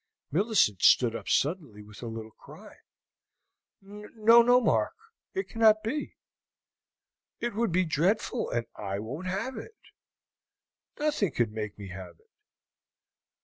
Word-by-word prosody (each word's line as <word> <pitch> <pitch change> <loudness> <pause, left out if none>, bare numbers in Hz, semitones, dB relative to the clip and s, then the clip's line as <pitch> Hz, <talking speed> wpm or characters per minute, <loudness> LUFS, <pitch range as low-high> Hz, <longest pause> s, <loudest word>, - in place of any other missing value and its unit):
Millicent 180 - +2
stood 120 -3 +5
up - - -6
suddenly 145 - -1
with 105 0 -14
a 120 - -6
little 110 -1 -7
cry. - - -15 1.1
"No, 210 +3 +3
no, 245 +1 +5
Mark, 250 - +1 0.4
it 385 - -2
cannot 220 -1 +3
be! 295 +7 -4 1.2
It 240 0 -3
would 225 -1 0
be 185 +2 +2
dreadful, 175 +7 0
and 120 -1 -2
I 100 -1 -4
won't 135 - -6
have 195 +8 -3
it. 445 - -10 1.2
Nothing 290 - 0
could 120 -3 0
make 105 -1 -6
me 100 -2 -9
have 90 -2 -9
it. - - -33
180 Hz, 130 wpm, -28 LUFS, -, 1.2 s, stood